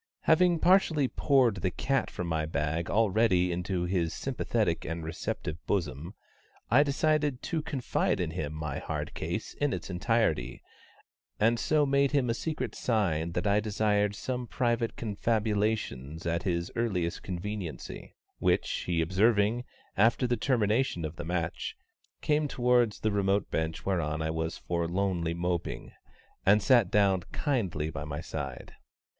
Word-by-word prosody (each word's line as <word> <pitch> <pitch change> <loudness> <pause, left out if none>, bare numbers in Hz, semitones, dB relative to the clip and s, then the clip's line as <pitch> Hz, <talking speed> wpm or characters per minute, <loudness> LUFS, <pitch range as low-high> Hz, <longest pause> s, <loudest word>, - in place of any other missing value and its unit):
Having 175 +1 +4
partially 170 -6 +4
poured 130 -7 +3
the 90 +1 0
cat 135 +8 -1
from 90 - -5
my 80 -2 -1
bag 80 +2 -1
already 105 -4 +3
into 90 +1 -2
his 90 -2 0
sympathetic - - -1
and 85 0 -4
receptive 80 0 -4
bosom, 85 -1 -2 0.6
I 125 +5 +7
decided 145 -1 +1
to 160 - -1
confide 145 -6 -1
to 90 - 0
him 80 -2 -4
my 75 -2 -4
hard - - -4
case - - -4
in 145 -3 0
its - - -5
entirety, 90 - 0 0.8
and 115 +2 +3
so 150 -1 +2
made 140 0 +2
him 130 -5 +2
a - - +1
secret 155 +6 -3
sign 85 -8 0
that - - -2
I 100 0 +3
desired 105 -1 +1
some 125 +1 -3
private 120 -1 0
confabulations 105 - -1
at 85 0 0
his 85 -3 -1
earliest 95 -8 -1
conveniency, 95 -1 -6 0.2
which - - +2 0.2
he 85 -2 +1
observing, 105 +6 +2 0.3
after 115 +5 +3
the 120 0 +1
termination 110 - +1
of 80 +2 -5
the 85 - -6
match, 85 -1 -2 0.5
came 150 0 +2
towards 120 -4 +2
the 110 - +1
remote 100 0 +1
bench 80 0 -2
whereon 80 -5 0
I 80 - -1
was 80 0 -2
forlornly 85 0 -1
moping, 85 -1 -3 0.5
and 105 +1 +4
sat 120 -7 +5
down 100 -3 +3
kindly 95 - -1
by - - -5
my 75 +1 -5
side. 70 -7 -6
100 Hz, 145 wpm, -29 LUFS, 85-120 Hz, 0.8 s, I